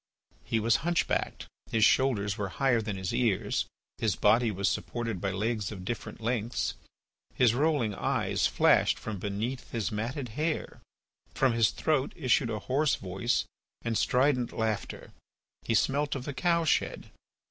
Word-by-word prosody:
He 115 - 0
was 115 +1 +3
hunch 170 +2 +1
backed; - - -2 0.3
his 110 -1 +4
shoulders 105 -7 +2
were 105 -3 -3
higher 125 0 +2
than 105 -2 -4
his 95 -1 -3
ears; 105 -4 +1 0.3
his - - +1
body 120 0 +4
was 100 -1 -1
supported 115 -6 -2
by 100 - 0
legs 105 +1 -1
of 95 -3 -8
different 120 - -5
lengths; 115 0 -1 0.6
his 120 -3 +4
rolling 140 -5 +1
eyes - - 0
flashed, - - +3
from 105 -3 -5
beneath 105 +7 -3
his 115 -1 -2
matted 120 +5 -3
hair. 155 +8 -3 0.5
From 130 -3 +3
his 115 -2 +4
throat 150 -4 0
issued 130 -4 +2
a 110 - -2
hoarse 140 +5 +1
voice 95 +5 -1 0.4
and 115 -1 -1
strident 125 0 +2
laughter; 110 -2 -3 0.5
he 115 - 0
smelt 145 +5 +1
of 130 -2 -5
the 145 - -4
cow 170 +2 +1
shed. - - 0
115 Hz, 155 wpm, -29 LUFS, 105-135 Hz, 0.6 s, his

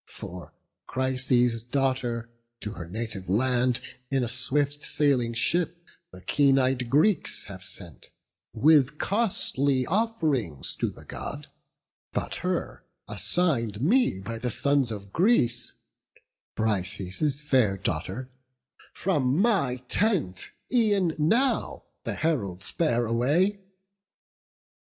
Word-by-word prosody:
For 90 0 -9 0.4
Chryses' 125 -2 +1
daughter 120 -2 -1 0.3
to 105 - -4
her 90 -5 -8
native 110 -2 -3
land 125 +3 +2 0.3
In 135 -2 +1
a - - -1
swift 140 +4 -1
sailing 130 -7 +1
ship 170 +9 +1 0.3
the 95 0 -13
keen 140 -2 +3
ey'd 130 -2 +1
Greeks 155 - +3
Have 95 -2 -8
sent, 90 -6 -4 0.4
with 150 -1 +4
costly 140 - +1
off'rings 160 - -1
to - - -1
the - - -13
God: - - -6 0.6
But - - -2
her, - - -3 0.2
assign'd 120 - 0
me 195 - +2
by 115 +4 -6
the 125 +2 -2
sons 140 0 +2
of 100 -2 -8
Greece, 185 - +2 0.8
Brises' 105 - 0
fair 130 -9 +2
daughter, 95 +8 -3 0.6
from 145 -8 +1
my 160 - +1
tent 165 - +1 0.2
e'en 205 -8 +3
now 235 - +1 0.2
The - - -2
heralds 100 - -2
bear 120 -8 +1
away. 145 - +1
130 Hz, 110 wpm, -26 LUFS, 110-155 Hz, 0.8 s, with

